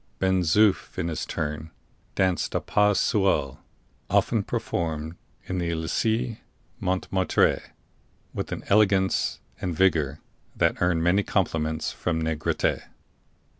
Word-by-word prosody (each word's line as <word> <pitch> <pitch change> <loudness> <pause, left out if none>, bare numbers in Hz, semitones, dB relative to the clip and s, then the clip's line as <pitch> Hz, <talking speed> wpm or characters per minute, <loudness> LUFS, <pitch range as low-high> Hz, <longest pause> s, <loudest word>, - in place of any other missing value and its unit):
Ben 95 -1 +2
Zoof, 95 +4 +2
in 85 -2 -1
his 80 - -4
turn, 75 +1 -4 0.5
danced 95 -2 0
a - - +3
pas 105 -1 +2
seul 95 -10 +1 0.5
(often - - +2
performed 80 -1 -3 0.3
in 95 -1 -3
the 85 -1 -1
Elysee 110 +8 -1 0.4
Montmartre) 95 0 +1 0.7
with - - -4
an - - -4
elegance 100 -2 +2 0.2
and 90 -3 -2
vigor 80 -5 +2 0.4
that - - +1
earned 85 -2 +2
many 90 +4 +3
compliments 80 -6 -1
from 80 -2 -2
Negrete. 80 -1 0
90 Hz, 115 wpm, -26 LUFS, 80-95 Hz, 0.7 s, a